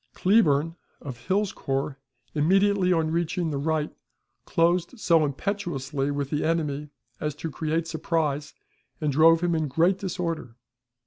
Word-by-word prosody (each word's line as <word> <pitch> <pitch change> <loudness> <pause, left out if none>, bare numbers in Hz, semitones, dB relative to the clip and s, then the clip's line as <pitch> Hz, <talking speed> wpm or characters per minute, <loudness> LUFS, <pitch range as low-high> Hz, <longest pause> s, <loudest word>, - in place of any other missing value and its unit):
Cleburne, 165 -5 +3 0.2
of 120 -4 -9
Hill's 200 +1 +1
corps, 135 +1 -3 0.3
immediately 190 +4 +3
on 160 -2 +1
reaching 170 0 -1
the 140 - -2
right, 155 +1 -1 0.5
closed 175 +7 +1
so 165 -6 +4
impetuously 145 -4 -2
with 140 -1 -3
the 150 - 0
enemy 150 -3 -1 0.3
as 150 -1 -3
to 160 +1 -5
create 160 +3 -1
surprise, 155 -2 -2 0.4
and 150 -2 0
drove 160 +3 +5
him 175 -1 +1
in 160 -2 0
great 170 +7 +2
disorder. 170 - -4
160 Hz, 135 wpm, -26 LUFS, 145-175 Hz, 0.5 s, drove